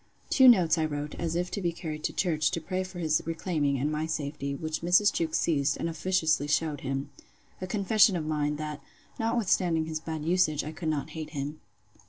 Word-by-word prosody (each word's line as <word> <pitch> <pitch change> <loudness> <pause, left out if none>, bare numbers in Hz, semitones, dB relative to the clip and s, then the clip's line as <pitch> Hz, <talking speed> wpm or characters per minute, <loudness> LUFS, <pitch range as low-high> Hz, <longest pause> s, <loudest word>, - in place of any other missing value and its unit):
Two 260 -2 +7
notes 180 -9 +6
I 160 - +2
wrote, 145 -1 -4
as 165 -1 -2
if 180 +1 -1
to 200 - -3
be 175 -2 0
carried 160 -3 -6
to - - 0
church, 155 -5 +1
to - - -2
pray 185 +3 -3
for 185 -1 -9
his 155 -3 +1
reclaiming, 160 -4 -1
and 145 +4 -1
my 155 +1 -2
safety; 145 -3 -3
which 155 +2 -4
Mrs. 180 +4 +4
Jewkes 160 -2 0
seized, 145 -4 +1
and - - -2
officiously 160 -3 +1
shewed 150 -1 0
him. 135 +1 -3 0.5
A 185 - -3
confession 200 +1 +3
of 160 -3 -2
mine, 150 -1 0
that, 150 0 -5 0.4
notwithstanding 190 -8 +1
his 155 -1 -3
bad 160 -1 -5
usage, 165 -4 +2
I 155 - -5
could 160 0 -4
not 155 0 -2
hate 155 -1 -6
him. 145 +3 -4
160 Hz, 205 wpm, -28 LUFS, 150-175 Hz, 0.5 s, Two